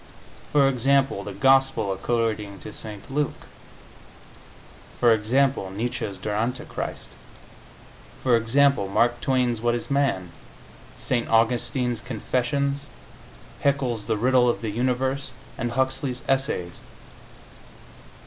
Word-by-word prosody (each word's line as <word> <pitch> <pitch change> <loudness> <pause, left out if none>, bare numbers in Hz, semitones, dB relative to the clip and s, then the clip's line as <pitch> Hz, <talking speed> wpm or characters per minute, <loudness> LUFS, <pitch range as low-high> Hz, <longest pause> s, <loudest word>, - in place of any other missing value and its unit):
For 140 -2 +5
example, 135 -3 +2
the 105 - -6
Gospel 135 -2 +3
according 105 -1 -1
to 105 - -8
St. 105 +1 -8
Luke. 145 0 -2 1.5
For 120 -2 +6
example, 115 0 +1
Nietzsche's 110 0 -3
"Der 105 +2 -4
Antichrist." 120 +4 -3 1.1
For 125 -2 +4
example, 120 0 +3
Mark 120 +5 +1
Twain's 125 -4 +1
"What 120 0 +2
Is 120 - -5
Man?", 135 -11 +1 0.7
St. 120 -2 -1
Augustine's 120 +2 +2
Confessions, 140 +5 -1 0.7
Haeckel's 130 -7 0
"The 110 - +1
Riddle 125 +2 +4
of 120 - -1
the 110 -2 -3
Universe," 130 +3 -1 0.2
and 120 0 -3
Huxley's 130 0 -1
Essays. 135 - -1
120 Hz, 105 wpm, -24 LUFS, 110-135 Hz, 1.5 s, For